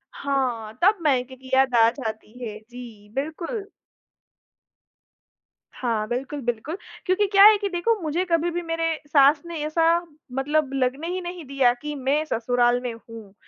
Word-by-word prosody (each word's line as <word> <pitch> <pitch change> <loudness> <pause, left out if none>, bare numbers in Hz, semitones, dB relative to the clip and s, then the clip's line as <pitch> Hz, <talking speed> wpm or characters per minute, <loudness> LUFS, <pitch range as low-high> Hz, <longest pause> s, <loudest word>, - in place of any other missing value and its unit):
हाँ, 250 -6 -2
तब 400 +4 +5
मायके 260 -3 +1
की 260 0 -14
याद 265 -1 +4
आ 230 -1 +6
जाती 225 -2 -7
है। 210 -1 -6
जी, 230 -4 -11
बिल्कुल। 335 - -4 2.1
हाँ, 225 -4 -1
बिल्कुल, 265 +5 -3
बिल्कुल। 240 +7 -3 0.3
क्योंकि 375 +2 +2
क्या 395 0 +7
है 425 -1 +8
कि 405 -1 -2
देखो, 375 +6 +1
मुझे 325 +3 -1
कभी 340 -1 +1
भी 350 - -2
मेरे 330 -1 -1
सास 290 0 +5
ने 340 -1 -6
ऐसा 320 +2 0 0.5
मतलब 295 +1 +1
लगने 270 +4 -1
ही 365 +1 -3
नहीं 350 -1 -6
दिया 265 -3 +3
कि 295 0 -4
मैं 280 +3 0
ससुराल 245 -2 +1
में 245 -2 -4
हूँ। 225 -3 -12
275 Hz, 155 wpm, -24 LUFS, 245-330 Hz, 2.1 s, है